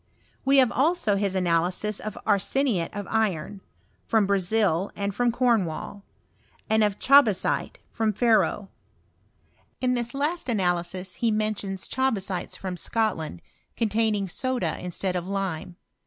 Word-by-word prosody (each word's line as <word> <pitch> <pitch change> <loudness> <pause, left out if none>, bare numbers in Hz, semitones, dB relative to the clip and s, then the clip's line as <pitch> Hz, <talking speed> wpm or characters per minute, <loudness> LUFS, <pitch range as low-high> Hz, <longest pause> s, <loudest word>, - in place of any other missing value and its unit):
We 275 +1 +4
have 255 -3 +5
also 280 - +2
his 195 -1 -1
analysis 180 +3 0
of 215 -1 -6
arseniate 205 -1 +1
of 205 -1 -5
iron, 205 -3 -1 0.5
from 220 -2 +3
Brazil 195 -1 +1
and 200 0 -2
from 245 +3 +1
Cornwall; 215 -6 0 0.6
and 220 0 +3
of 205 -1 +1
ohabasite 265 -8 +3 0.2
from 220 -1 0
Ferro. 215 -2 +2 1.1
In 250 -1 +1
this 240 0 -2
last 295 +2 -2
analysis 180 -3 -1
he 235 - +3
mentions 215 -3 -2
chabasites 205 -9 -2
from 185 -2 -5
Scotland, 175 - -2 0.3
containing 215 -2 +1
soda 245 -3 -1
instead 180 +1 -3
of 180 0 -3
lime. 190 -3 -3
205 Hz, 125 wpm, -26 LUFS, 185-230 Hz, 1.1 s, have